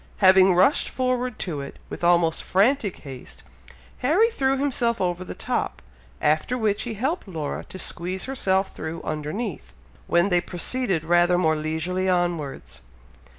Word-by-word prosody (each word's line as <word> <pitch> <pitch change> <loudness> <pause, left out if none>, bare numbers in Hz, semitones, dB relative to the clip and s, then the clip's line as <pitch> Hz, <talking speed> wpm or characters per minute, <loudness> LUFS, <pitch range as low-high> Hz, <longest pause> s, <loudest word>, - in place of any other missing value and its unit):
Having 190 -1 +6
rushed 190 +11 +3
forward 255 -2 -1
to 155 -6 -4
it, 140 - -8
with - - -8
almost 170 -2 +3
frantic 210 +2 +1
haste, 135 -4 -9 0.6
Harry 365 - +3
threw 270 -8 +1
himself 250 -4 +1
over 180 -1 -1
the - - -8
top, - - -2 0.4
after 155 +11 +1
which 215 -3 0
he 235 -3 -4
helped 270 - -2
Laura 160 -6 -4
to - - -10
squeeze 185 +1 -2
herself 195 -8 0
through 160 +1 -6
underneath, 155 +9 -4 0.3
when 175 +3 +3
they 175 -2 +3
proceeded 185 0 -1
rather 175 +1 +3
more 160 -3 +2
leisurely 160 +5 -2
onwards. 175 -6 -2
185 Hz, 145 wpm, -24 LUFS, 170-240 Hz, 0.6 s, Having